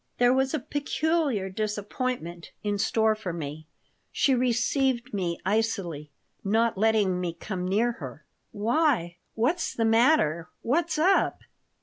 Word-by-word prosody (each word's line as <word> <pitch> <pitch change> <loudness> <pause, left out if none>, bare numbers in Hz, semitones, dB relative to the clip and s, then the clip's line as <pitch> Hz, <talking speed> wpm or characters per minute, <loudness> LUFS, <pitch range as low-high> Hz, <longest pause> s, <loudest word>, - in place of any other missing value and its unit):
There 245 0 +4
was 265 +3 +1
a - - -1
peculiar 290 - -1
disappointment 205 -2 -4
in 205 -1 -1
store 220 +1 +2
for 215 -4 -5
me. 155 -1 -6 0.4
She 275 - +2
received 250 +1 +1
me 175 -4 -1
icily, 190 -8 -1 0.3
not 225 +3 +2
letting 205 -3 +2
me 175 -2 -2
come 180 0 -4
near 220 +6 +2
her 145 - -9 0.3
"Why, 220 - +1 0.2
what's 315 +10 0
the 225 - +1
matter? 225 - +3
What's 320 +7 0
up?" 370 +5 +2
220 Hz, 125 wpm, -27 LUFS, 180-255 Hz, 0.4 s, There